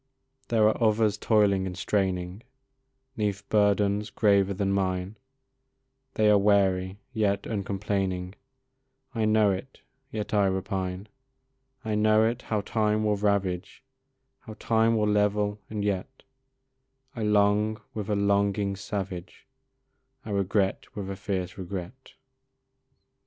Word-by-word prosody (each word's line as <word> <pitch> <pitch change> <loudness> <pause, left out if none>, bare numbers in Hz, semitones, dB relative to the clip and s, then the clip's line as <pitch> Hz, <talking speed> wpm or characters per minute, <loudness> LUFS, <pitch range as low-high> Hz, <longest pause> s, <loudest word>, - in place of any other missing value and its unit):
There 110 -2 +3
are 110 +2 +1
others 110 -1 +3
toiling 100 -3 +2
and 90 -1 -6
straining 95 0 -1 0.8
'Neath 100 -2 -2
burdens 105 0 +2
graver 100 -2 +3
than 100 0 -1
mine 95 0 -1 1.0
They 110 - +3
are 105 - +5
weary, 95 -2 +2 0.2
yet 105 -3 0
uncomplaining 95 -3 -2 0.8
I 110 -3 0
know 110 -1 +4
it, 95 +8 -6 0.3
yet 105 -4 -4
I 100 -2 +4
repine; 95 0 -3 0.8
I 110 - -1
know 110 +1 +4
it, 120 +2 -1
how 105 -2 -2
time 110 0 0
will 105 -1 +2
ravage, 100 -1 -1 0.6
How 110 -3 -11
time 115 0 +2
will 105 -1 +1
level, 105 0 +1
and 105 -1 -3
yet 100 +6 -3 0.9
I 115 - -5
long 105 +1 +2
with 105 -1 -5
a 105 - +1
longing 100 0 +1
savage, 95 -2 -6 0.8
I 110 - -6
regret 100 +3 -1
with 100 -2 -4
a - - -4
fierce 95 -2 -4
regret. 95 +7 -7
100 Hz, 120 wpm, -27 LUFS, 95-105 Hz, 1.0 s, are